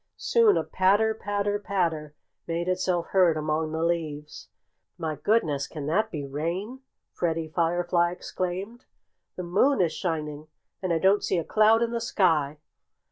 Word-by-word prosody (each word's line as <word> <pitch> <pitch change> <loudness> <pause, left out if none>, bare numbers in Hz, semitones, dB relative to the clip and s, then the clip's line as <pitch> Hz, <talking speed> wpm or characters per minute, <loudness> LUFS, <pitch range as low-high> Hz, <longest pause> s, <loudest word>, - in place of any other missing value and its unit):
Soon 460 -3 +4
a - - +1
patter, 205 +4 +2
patter, 205 -1 -2
patter 165 -7 -2 0.3
made 170 +1 -2
itself 185 -2 0
heard 180 -4 +4
among 155 +1 -1
the 160 +1 -2
leaves. 155 -3 -3 0.5
"My 160 -3 -3
goodness! 150 -7 +1
Can 150 -4 -7
that 215 +9 +1
be 150 -7 -5
rain?" 170 - -4 0.3
Freddie 165 -2 -2
Firefly 175 0 +2
exclaimed. 185 +7 -5 0.5
"The 180 - -5
moon 200 +10 +2
is 175 -4 +2
shining. 155 -4 -4 0.3
And 185 -2 -1
I 165 - +3
don't 190 +4 +3
see 185 - 0
a 170 - 0
cloud 220 +5 +4
in 235 - -1
the 235 -1 -2
sky." 160 -10 +1
175 Hz, 150 wpm, -26 LUFS, 160-205 Hz, 0.5 s, Soon